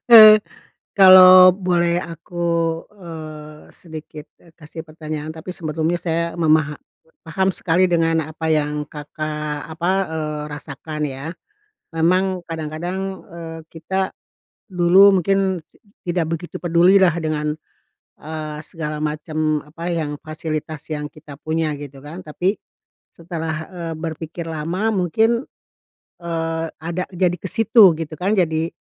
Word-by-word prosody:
eee, 215 -2 +11 0.6
kalau 185 -1 +10
boleh 175 -2 +1
aku, 170 0 -6 0.5
eee, 155 -4 -10
sedikit, 155 -2 -10 0.2
eee, 165 -2 -21
kasih 160 0 -9
pertanyaan, 155 -1 -6
tapi 160 +3 -8
sebelumnya 160 +1 -2
saya 170 -1 0
memaha 155 -2 +2 0.5
paham 190 +4 0
sekali 175 +2 +2
dengan 165 -1 +2
apa 155 +1 -5
yang 150 -1 0
Kakak, 150 0 -5
apa, 170 +3 -2 0.2
eee, 155 -1 -3
rasakan 150 +1 -7
ya, 135 +1 -6 0.7
memang 185 +2 +1
kadang-kadang, 165 +3 -4 0.3
eee, 165 -1 -8
kita, 190 +4 -2 0.6
dulu 185 +2 +6
mungkin 190 0 +1 0.5
tidak 175 -1 0
begitu 165 +1 -5
pedulilah 175 +2 +5
dengan, 150 -1 -2 0.7
eee, 155 -1 -6
segala 150 -3 -5
macam 155 0 -2
apa 165 +3 -7
yang 160 -4 -2
fasilitas 155 -1 -5
yang 150 -1 -3
kita 150 -2 -13
punya 155 0 -1
gitu 140 -2 -10
kan, 160 +5 -8
tapi 180 +6 -1 0.6
setelah, 165 -2 -5
eee, 170 -3 -6
berpikir 165 +1 -6
lama 165 +7 -2
mungkin, 220 +7 +1 0.8
eee, 165 -1 -2 0.2
ada 175 +2 -3
jadi 180 0 +1
ke 190 - -7
situ 220 -4 +6
gitu 160 -1 -5
kan 195 +4 +1
jadi 160 -3 +1
165 Hz, 120 wpm, -20 LUFS, 155-180 Hz, 0.8 s, eee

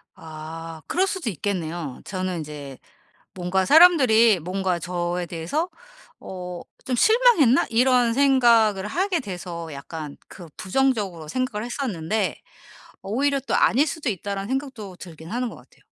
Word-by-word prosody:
아. 160 +1 -9
그럴 375 +2 +1
수도 375 - -2
있겠네요. 170 -6 -4
저는 185 -2 -3
인제 145 -3 -8 0.6
뭔가 185 +1 0
사람들이 260 - +6
뭔가 185 +1 -1
저에 175 0 -3
대해서 175 - -2 0.5
어 180 -2 -7 0.2
'좀 255 - -1
실망했나?' 435 - +5
이런 245 0 +3
생각을 235 -7 +4
하게 360 - 0
돼서 175 -6 -7
약간 145 +1 -7
그 175 - -11
부정적으로 195 - -1
생각을 230 +1 -2
했었는데 215 - -2 0.7
오히려 275 +7 0
또 270 - -2
'아닐 275 +5 +4
수도 295 -2 -3
있다.'라는 200 0 -4
생각도 260 -8 -4
들긴 165 -3 -11
하는 245 +1 -1
것 - - -10
같아요. - - -21
200 Hz, 295 characters per minute, -23 LUFS, 175-260 Hz, 0.7 s, 사람들이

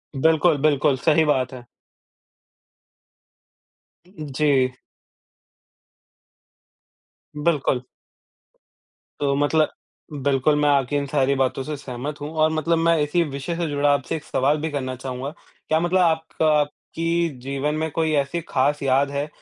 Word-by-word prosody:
बिल्कुल, 160 +2 +3
बिल्कुल, 145 -1 +3
सही 160 +4 +3
बात 130 -3 +1
है। 125 -2 -10 2.4
उ - - -22
उ 150 - -7
जी। 150 - +2 2.9
बिल्कुल। 150 -4 +1 1.4
तो 140 -1 +1
मतलब 145 +2 +2 0.5
बिल्कुल, 140 +2 +2
मैं 150 0 +2
आपकी 140 0 +2
इन 145 - 0
सारी 140 -1 +1
बातों 135 0 0
से 150 +2 -4
सहमत 140 +2 -6
हूँ, 145 - -4
और 155 0 +3
मतलब 160 +2 +1
मैं 165 0 +3
इसी 150 +4 +1
विषय 140 +5 -4
से 170 -2 -1
जुड़ा 145 0 +1
आपसे 140 -2 -2
एक 155 - -6
सवाल 140 +2 +1
भी 160 - -2
करना 130 -3 -3
चाहूँगा। 130 +1 -5 0.4
क्या 155 - +2
मतलब 175 +2 +1
आपका 160 -1 +1
आपकी 165 +3 -2
जीवन 140 +3 -2
में 160 +1 -1
कोई 160 +1 0
ऐसी 140 +4 0
खास 145 +2 +1
याद 135 +1 +2
है, 140 +1 -2
145 Hz, 135 wpm, -23 LUFS, 135-160 Hz, 2.9 s, बिल्कुल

